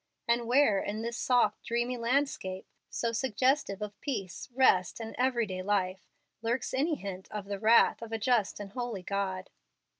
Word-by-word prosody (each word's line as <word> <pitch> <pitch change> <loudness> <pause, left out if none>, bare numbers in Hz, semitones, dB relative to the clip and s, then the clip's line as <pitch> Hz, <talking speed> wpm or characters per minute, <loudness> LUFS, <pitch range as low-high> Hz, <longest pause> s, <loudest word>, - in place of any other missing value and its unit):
and 235 0 +1
where 245 -5 +4
in 215 +2 -3
this 235 0 -3
soft, 245 -4 +2
dreamy 240 +2 -1
landscape, 235 -6 -1 0.2
so 230 - -1
suggestive 255 -2 +1
of 205 -1 -8
peace, 205 - -4
rest, 235 -9 +3
and 225 -1 -6
everyday 235 -7 0
life, 190 -1 -1 0.3
lurks 235 +3 -1
any 300 +5 +1
hint 190 -6 -7
of 210 -2 -5
the 200 0 -4
'wrath 225 +3 +5
of 230 -1 -7
a 225 - -1
just 220 -3 +1
and 200 -1 -7
holy 240 -5 -4
God'?" 190 -1 -3
225 Hz, 160 wpm, -30 LUFS, 200-245 Hz, 0.3 s, wrath